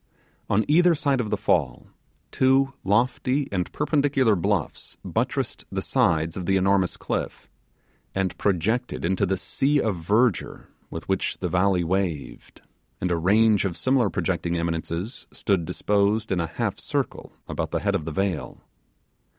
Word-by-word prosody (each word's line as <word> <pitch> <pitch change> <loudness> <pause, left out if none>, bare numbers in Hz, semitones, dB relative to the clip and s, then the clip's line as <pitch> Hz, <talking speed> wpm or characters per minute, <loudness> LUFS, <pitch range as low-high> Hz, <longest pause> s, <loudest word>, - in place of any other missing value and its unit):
On 110 +2 +2
each 175 +4 +5
side 140 -3 +1
of 110 - -4
the - - 0
fall, - - 0 0.5
two 135 +1 +3
lofty 125 +6 +1
and 90 -3 -2
perpendicular 140 -6 +2
bluffs 95 -2 -2
buttressed - - -2
the - - -2
sides 80 0 +1
of 90 -2 -5
the 95 - +3
enormous 95 -1 +2
cliff, - - -4 0.7
and 95 -1 -1
projected 105 +4 0
into 95 +3 +1
the 95 +1 0
sea 145 +9 +1
of 110 -6 0
verdure 105 +3 0 0.2
with 80 - -7
which 95 -1 -1
the 90 - -3
valley 90 +1 +2
waved, 85 -4 -3 0.4
and 90 - -1
a - - +2
range 105 +5 +3
of 95 -4 -2
similar 130 -5 +2
projecting 85 0 -1
eminences 85 +6 -3
stood 95 -5 0
disposed 105 +4 +1
in 95 - +1
a 85 - -1
half 85 - -3
circle - - -3
about - - -3
the - - -2
head - - +1
if - - -1
the 80 - -5
vale. 95 0 -3
100 Hz, 150 wpm, -25 LUFS, 90-120 Hz, 0.7 s, each